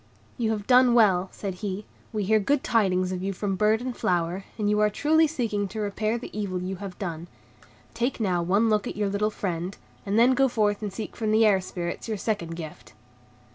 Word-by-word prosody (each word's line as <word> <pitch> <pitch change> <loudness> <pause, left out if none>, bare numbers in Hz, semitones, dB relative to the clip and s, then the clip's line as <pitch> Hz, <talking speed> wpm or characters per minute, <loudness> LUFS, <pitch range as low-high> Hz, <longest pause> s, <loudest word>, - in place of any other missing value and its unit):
"You 230 -2 -1
have 210 -2 -2
done 250 0 +5
well," 190 -5 +4
said 195 -2 -5
he, 205 0 -4 0.3
"we 215 -2 -2
hear 215 +3 +3
good 270 +7 +1
tidings 185 -5 +2
of 180 -1 -3
you 195 +1 -2
from 195 +1 -2
bird 215 +3 +2
and 250 -1 -4
flower, 175 +2 -1
and 210 -2 -1
you 210 0 +2
are 210 0 +4
truly 315 +8 +3
seeking 225 -9 -1
to 215 +4 -7
repair 215 +2 -1
the 235 - -9
evil 200 -4 -2
you 185 +1 -4
have 190 -1 -8
done. 170 -3 -5 0.7
Take 245 +2 -1
now 185 -5 +1
one 195 +6 +2
look 215 -2 +1
at - - -5
your 205 -1 0
little 205 +2 0
friend, 185 -3 -4 0.3
and 200 +1 -1
then 245 +3 +6
go 270 +1 +4
forth 210 -4 +1
to 210 - -3
seek 200 +3 -7
from 220 -2 -2
the 220 +1 +5
Air 195 -3 +4
Spirits 175 +1 -5
your 220 -2 -2
second 185 -6 -2
gift." 150 -10 -9
205 Hz, 215 wpm, -26 LUFS, 185-220 Hz, 0.7 s, then